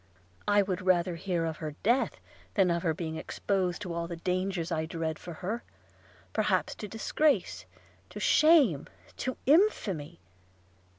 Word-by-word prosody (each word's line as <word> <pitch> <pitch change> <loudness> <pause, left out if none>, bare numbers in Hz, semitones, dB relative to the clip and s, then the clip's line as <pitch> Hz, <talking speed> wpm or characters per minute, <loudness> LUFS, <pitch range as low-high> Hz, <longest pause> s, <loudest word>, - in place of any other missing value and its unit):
I 205 0 +5
would 190 -1 -2
rather 180 -1 +2
hear 175 -1 -1
of 160 -2 -3
her 155 -2 -5
death, 240 +5 +2 0.4
than 190 -4 +4
of 170 0 0
her 165 - +1
being 160 0 -4
exposed 190 +2 -1
to 180 -3 -4
all 170 0 -2
the 170 - -5
dangers 180 0 -2
I 160 -1 -1
dread 160 -1 -3
for 175 - -8
her, 225 +5 -2 0.7
perhaps - - +1
to 210 - -7
disgrace, 280 +8 0 0.4
to - - -8
shame, 295 - +5 0.3
to 260 - -3
infamy 260 - +2
180 Hz, 150 wpm, -29 LUFS, 165-205 Hz, 0.7 s, I